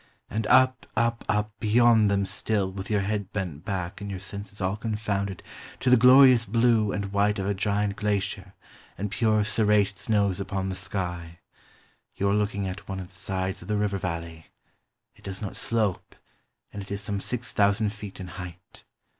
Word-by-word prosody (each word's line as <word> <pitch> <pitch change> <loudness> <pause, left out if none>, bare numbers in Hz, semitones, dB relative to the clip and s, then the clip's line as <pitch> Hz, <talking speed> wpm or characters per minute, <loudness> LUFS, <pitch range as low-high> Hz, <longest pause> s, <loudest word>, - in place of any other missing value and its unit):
and 110 +1 -2
up, 130 0 +4
up, 115 0 +1
up, 105 0 +1
beyond 110 -1 +4
them 100 -1 +1
still, 100 0 0
with 95 0 -7
your 105 -2 +2
head 100 0 -2
bent 90 -7 -4
back 95 -1 -4
and 100 - -5
your 95 -2 -5
senses 100 +2 -7
all 95 0 0
confounded, 105 -3 -3 0.4
to 125 - +1
the - - +9
glorious 125 0 +7
blue 115 -1 +2
and 100 -1 -4
white 105 +1 +2
of 95 - -2
a 100 - +1
giant 100 0 0
glacier, 100 -2 -2 0.4
and 100 +1 -3
pure 110 -1 +2
serrated 105 -2 +2
snows 100 -4 +1
upon 95 -1 -3
the 95 - -3
sky. 90 -3 -4 0.8
You 100 - 0
are - - +2
looking 105 -1 0
at 95 +2 -7
one 95 -1 -3
of 90 -1 -8
the - - -17
sides 95 0 -3
of - - -11
the 105 0 0
river 100 -1 0
valley. 85 -2 -5 0.7
It - - -22
does 95 -1 -6
not 100 - -5
slope, 110 -5 -1 0.6
and 100 - -5
it 95 - -10
is 100 0 -4
some 100 0 -3
six 125 +2 -3
thousand 105 0 +2
feet 105 -3 -9
in 95 - -6
height. 90 0 -10
100 Hz, 185 wpm, -26 LUFS, 95-105 Hz, 0.8 s, the